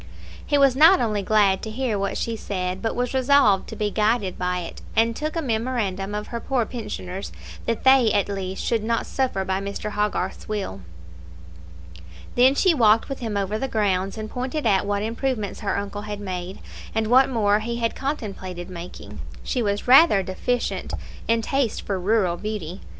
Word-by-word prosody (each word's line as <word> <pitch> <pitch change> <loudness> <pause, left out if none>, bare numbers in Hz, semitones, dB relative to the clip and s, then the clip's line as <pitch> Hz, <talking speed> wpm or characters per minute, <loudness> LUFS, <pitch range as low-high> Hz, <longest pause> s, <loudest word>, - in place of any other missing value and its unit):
He 290 - +1
was 275 -2 +5
not 325 +7 +7
only 215 -3 0
glad 200 -1 +3
to 220 - -5
hear 235 0 -1
what 200 - -1
she 230 - -2
said, 185 -3 -3
but 225 - -2
was 245 +1 -1
resolved 260 -7 +4
to - - -7
be 210 -1 -1
guided 210 -3 +1
by 180 0 -1
it, 170 - -8
and 230 +1 +3
took 305 +4 -3
a 330 - -1
memorandum 220 -5 -2
of 210 0 -5
her 235 - -4
poor 245 0 0
pensioners, 205 -5 -6 0.4
that 230 -1 -1
they, 260 -4 +6
at 205 -2 +2
least, 195 -1 -4
should 230 -3 0
not 230 +1 0
suffer 250 -8 -1
by 190 +1 -1
Mr. 200 +1 -4
Hogarth's 210 0 -2
will. 195 - -3 1.5
Then 255 +3 +5
she 370 +3 +4
walked 225 -5 +4
with 275 - -4
him 220 -4 -3
over 200 +2 -1
the 270 - -1
grounds, 195 -4 0
and 215 0 -4
pointed 255 +6 -4
out 200 -2 +2
what 205 0 0
improvements 230 -2 -2
her 210 - -1
uncle 200 0 -4
had 210 -1 -6
made, 185 -2 -5 0.4
and 220 0 +1
what 255 +4 +5
more 210 -4 +2
he 235 +2 -3
had 230 -1 -1
contemplated 195 - -5
making. 175 0 -9 0.2
She 250 - -1
was 205 0 -1
rather 255 - +7
deficient 235 +6 -2 0.3
in 230 0 +2
taste 270 -2 0
for 195 -2 -2
rural 185 -2 +1
beauty. 200 -3 -5
215 Hz, 185 wpm, -23 LUFS, 195-245 Hz, 1.5 s, not